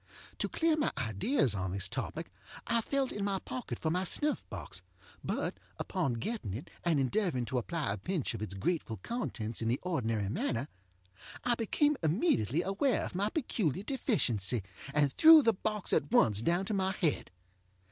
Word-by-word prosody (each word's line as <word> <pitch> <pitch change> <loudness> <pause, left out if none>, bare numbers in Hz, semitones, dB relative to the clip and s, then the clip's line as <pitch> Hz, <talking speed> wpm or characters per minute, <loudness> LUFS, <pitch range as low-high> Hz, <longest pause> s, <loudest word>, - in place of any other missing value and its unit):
To - - 0
clear 330 -1 +2
my 305 - +1
ideas 120 - +1
on 95 -2 -2
this 100 -1 0
topic - - -5 0.3
I 230 - +2
felt 275 +2 -1
in 205 - -3
my 200 -1 0
pocket 250 +5 -5
for 160 - -1
my 180 +2 +1
snuff 295 - +3
box, - - -6 0.4
but, - - -2 0.2
upon 165 -9 -1
getting 115 - -3
it, 125 - -8
and 165 -4 +2
endeavoring 135 - 0
to 130 +1 -1
apply 150 -2 -2
a - - -5
pinch 165 - -2
of - - -6
its 95 -3 -4
grateful 115 - -1
contents 120 - -3
in 115 - -1
the 120 +3 +1
ordinary 115 - -1
manner, 120 +5 -2 0.7
I 245 - +2
became 280 +6 +1
immediately 160 - +2
aware 205 +6 +1
of - - -7
my 200 +4 0
peculiar 205 - -1
deficiency, 125 - 0 0.3
and 145 -1 +2
threw 320 -1 +9
the 230 - +4
box 210 +1 -1
at - - +1
once 110 - +4
down 175 +8 +1
to 215 - -2
my 190 -1 +1
head. 170 -7 0
175 Hz, 175 wpm, -32 LUFS, -, 0.7 s, threw